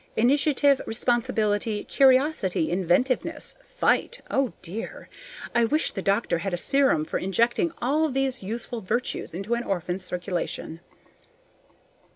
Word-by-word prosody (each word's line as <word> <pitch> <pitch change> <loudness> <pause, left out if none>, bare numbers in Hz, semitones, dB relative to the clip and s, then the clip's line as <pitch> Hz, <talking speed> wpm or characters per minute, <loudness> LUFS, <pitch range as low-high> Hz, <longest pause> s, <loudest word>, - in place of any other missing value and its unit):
Initiative, 280 +3 +3
responsibility, 225 -3 0
curiosity, 260 - +3
inventiveness, 190 +8 0
fight - - 0
oh 270 -3 +1
dear! 190 +6 -7 0.4
I 235 - +3
wish 300 +7 +1
the 195 - -4
doctor 195 -3 +1
had 185 0 -2
a - - -5
serum 265 - +2
for - - -2
injecting 235 - +1
all 305 +5 +2
these 265 -1 -1
useful 225 +3 -4
virtues 220 -3 -2
into 195 +6 -2
an 235 0 0
orphan's 180 -1 -3
circulation. 180 -2 -4
235 Hz, 120 wpm, -25 LUFS, 190-270 Hz, 0.4 s, Initiative